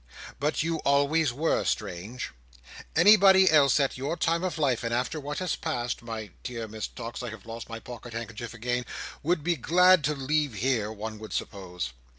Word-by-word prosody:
But 150 +2 0
you 165 0 -1
always 145 +1 +2
were 150 +7 0
strange. 105 +9 -3 0.6
Anybody 190 0 +7
else 145 -2 +5
at 135 -2 0
your 145 +6 -2
time 165 +1 +1
of 185 -3 -2
life, 135 -7 +1
and 115 - -2
after 125 +6 -1
what 145 +1 -5
has 185 -3 -1
passed—my 120 -6 -4
dear 115 -3 -5
Miss 110 0 -5
Tox, 115 +2 -7
I 125 - -4
have 110 -1 -10
lost 115 0 -8
my 115 0 -6
pocket 120 0 -10
handkerchief 115 +1 -6
again—would 125 +7 -3
be 175 +1 +1
glad 180 +4 +5
to 150 +1 +1
leave 145 -1 0
here, 110 -1 0
one 110 0 -6
would 110 -3 -8
suppose." 90 - -4
125 Hz, 170 wpm, -27 LUFS, 115-155 Hz, 0.6 s, Anybody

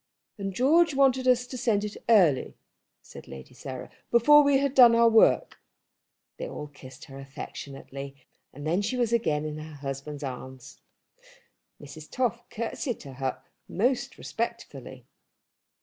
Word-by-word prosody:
"And 195 0 -3
George 295 - +3
wanted 265 -1 +3
us 250 -1 +3
to 250 0 -7
send 210 -4 +1
it 210 0 -5
early," 180 - +4 0.5
said - - -13
Lady 70 - -11
Sarah, 130 0 -8 0.2
"before 295 +6 +7
we 280 -1 +4
had 275 -1 0
done 245 -4 +8
our 235 0 +5
work." 225 -1 +4 0.8
They - - -5
all 150 - -6
kissed 145 -3 -13
her 135 0 -11
affectionately, 135 0 -8 0.4
and 145 +2 -10
then 170 +5 +1
she 225 +5 -2
was 235 -2 0
again 155 -10 +1
in 155 0 -5
her 155 0 -9
husband's 140 +1 -6
arms. 130 0 -8 1.0
Mrs. 150 +2 -11
Toff 250 -4 -2
curtseyed 230 +1 -4
to 135 -3 -10
her 130 0 -4 0.3
most 245 +6 -1
respectfully. - - -6
190 Hz, 145 wpm, -27 LUFS, -, 1.0 s, done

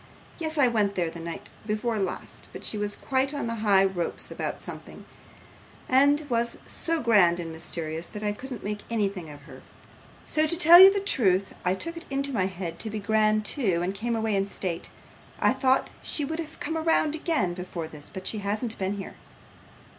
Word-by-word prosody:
Yes, 315 -1 -2
I 280 -3 +6
went 210 -4 +1
there 170 -3 0
the 170 - -9
night 165 0 -7 0.2
before 215 +1 -1
last, 190 -2 -5
but - - -9
she - - -2
was 205 0 -2
quite 270 +2 0
on 285 - -2
the 230 - -2
high 195 -3 +5
ropes 185 -3 -2
about - - -4
something, - - -9 0.8
and 285 +3 +4
was 235 -2 0
so 330 -3 -1
grand 190 -7 +4
and 165 -1 -5
mysterious, 160 0 -4
that 210 0 -8
I 210 - +1
couldn't 250 +2 -8
make 210 +1 -3
anything 200 -7 -2
of 145 -1 -11
her: 135 -3 -13 0.6
so, 310 0 +1
to 340 - +2
tell 345 0 +9
you 380 +1 +11
the 400 - 0
truth, 195 - +2
I 180 +1 +2
took 335 - -4
it 335 - -9
into 275 0 -2
my 190 -5 +1
head 185 -3 -6
to 220 - -3
be 215 0 -4
grand 215 0 +2
too, 195 - 0
and 185 +2 -1
came 230 +4 -2
away 220 -2 0
in 195 0 +1
state. 180 -4 -4 0.5
I - - +4
thought 260 -1 +2
she 295 - -2
would 315 +3 -4
have 320 -1 -7
come 320 +2 -3
round 320 -2 +2
again 310 - 0
before 175 -2 -6
this, 150 -2 -11
but 190 -1 -8
she 215 - -2
hasn't 210 +3 -3
been 190 +1 -1
here. 195 - -7
215 Hz, 200 wpm, -26 LUFS, 185-275 Hz, 0.8 s, you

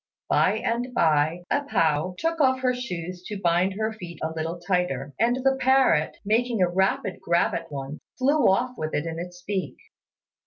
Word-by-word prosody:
By - - +4
and 240 +2 -2
by 160 +1 +2
A 285 - +2
pao 165 - +1
took 330 -1 -1
off 260 -2 +3
her 255 -1 +2
shoes 180 -8 -5
to 210 - -5
bind 180 +1 +2
her 220 +1 -1
feet 175 -6 -9
a 160 - -1
little 165 +2 -3
tighter; 175 -7 -1
and 235 +3 +3
the 270 0 +3
parrot, 260 - +3
making 230 +2 +1
a 180 - +4
rapid 190 +1 0
grab 170 0 +2
at 165 -1 -5
one, 140 +1 -6 0.2
flew 280 +3 +3
off 245 +6 +1
with 155 0 -3
it 150 - -1
in 165 0 -4
its 175 0 -8
beak. 190 -1 -3
185 Hz, 185 wpm, -25 LUFS, 165-245 Hz, 0.2 s, By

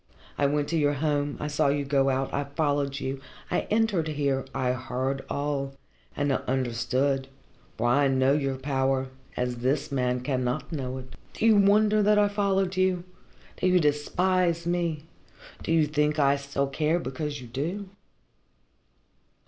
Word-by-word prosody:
I 140 - +2
went 145 0 0
to 165 - +1
your 145 -1 +2
home, 145 0 0
I - - -3
saw 145 -1 +1
you 140 0 +1
go 135 -1 +2
out, 135 0 -1
I 140 - -1
followed 145 -1 -1
you, 135 0 -4 0.3
I - - 0
entered 215 -7 +2
here 140 -3 0
I 125 -2 0
heard 130 +1 -2
all 140 -1 -2 0.4
and 145 -1 +1
I - - +2
understood, 130 +2 0 0.5
for 120 - -1
I 140 +4 +4
know 130 0 +3
your 135 -2 0
power, 135 -1 0 0.3
as 125 0 -1
this 130 +5 -1
man 125 -2 0
cannot 125 0 -2
know 130 -4 -3
it. 130 -1 -10 0.2
Do - - -1
you 225 -1 +6
wonder 210 +1 +4
that 210 +1 +4
I 205 0 +4
followed 195 -2 0
you? 185 -1 +1 0.5
Do - - +1
you 180 0 +5
despise 170 +3 +1
me? 170 -3 -1 0.6
Do - - -3
you 165 -2 +4
think 150 0 +1
I 140 -1 +4
still 140 0 -2
care, 150 +4 0
because 145 -1 -4
you 125 - -9
do? 160 - -4
145 Hz, 165 wpm, -27 LUFS, 135-165 Hz, 0.6 s, you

